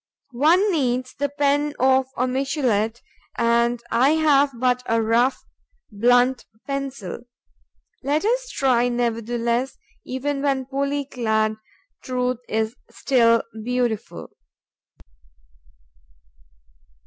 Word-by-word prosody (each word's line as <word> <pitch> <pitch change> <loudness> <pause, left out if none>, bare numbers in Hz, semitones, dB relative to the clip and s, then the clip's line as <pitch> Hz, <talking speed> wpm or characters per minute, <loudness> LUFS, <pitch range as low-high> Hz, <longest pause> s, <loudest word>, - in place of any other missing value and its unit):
One 355 +8 +4
needs 255 -5 -1
the 285 +1 -2
pen 290 +1 0
of 260 0 +3
a 250 - +1
Michelet; 250 -5 -1 0.3
and 235 +1 +2
I 265 +6 +4
have 290 -3 +4
but 250 0 +1
a 230 0 +2
rough, 230 +4 +1 0.5
blunt 245 +4 +2 0.2
pencil. 275 -8 -5 0.8
Let 295 +7 0
us - - 0
try, 245 -2 +2
nevertheless: 235 +1 -1 0.3
even 275 +2 -3
when 270 -2 0
poorly 280 +1 -2
clad, 220 -4 0 0.5
truth 250 -1 -2
is 220 +1 -1
still 230 -1 +2 0.2
beautiful. 245 -2 -2
255 Hz, 95 wpm, -22 LUFS, 235-275 Hz, 0.8 s, One